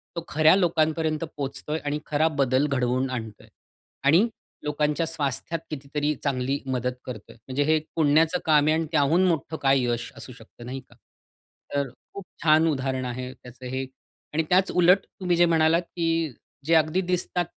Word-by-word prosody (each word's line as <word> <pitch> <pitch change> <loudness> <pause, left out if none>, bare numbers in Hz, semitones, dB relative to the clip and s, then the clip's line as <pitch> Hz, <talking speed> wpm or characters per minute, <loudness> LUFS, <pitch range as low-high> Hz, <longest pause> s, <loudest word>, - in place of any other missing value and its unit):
तो 170 - -4
खऱ्या 155 +3 +5
लोकांपर्यंत 160 -3 +1
पोहोचतोय 140 +3 -3
आणि 145 +1 -1
खरा 155 +2 +2
बदल 135 +1 +2
घडवून 130 -1 0
आणतोय 110 -4 -6 0.6
आणि 170 +11 +5 0.4
लोकांच्या 150 +2 0
स्वास्थ्यात 155 +1 -2
कितीतरी 150 +1 -2
चांगली 135 0 -1
मदत 125 -1 -1
करतोय. 115 -5 -9
म्हणजे 130 +5 -2
हे 155 +1 +3 0.2
पुण्याचं 160 +2 +3
काम 150 -2 +4
आहे 155 - +4
आणि 165 - -1
त्याहून 160 +4 +3
मोठं 160 -1 -1
काय 135 -1 +4
यश 120 -1 -2
असू 125 - -9
शकतं, 120 0 -14
नाही 130 +2 -5
का? - - -19 0.8
तर 140 -2 0 0.2
खूप 200 -2 -8 0.2
छान 160 +1 +5
उदाहरण 130 -3 -1
आहे 125 +1 -5
त्याचं 125 +1 -13
हे 130 +1 -3 0.5
आणि 160 +1 +1
त्याच 185 +1 +3
उलट 180 +2 +4
तुम्ही 180 -2 +1
जे 175 - +6
म्हणालात 165 0 +3
की 170 -1 0 0.6
जे 165 - +2
अगदी 160 +4 +3
दिसतात 180 -1 -1
150 Hz, 160 wpm, -25 LUFS, 130-165 Hz, 0.8 s, जे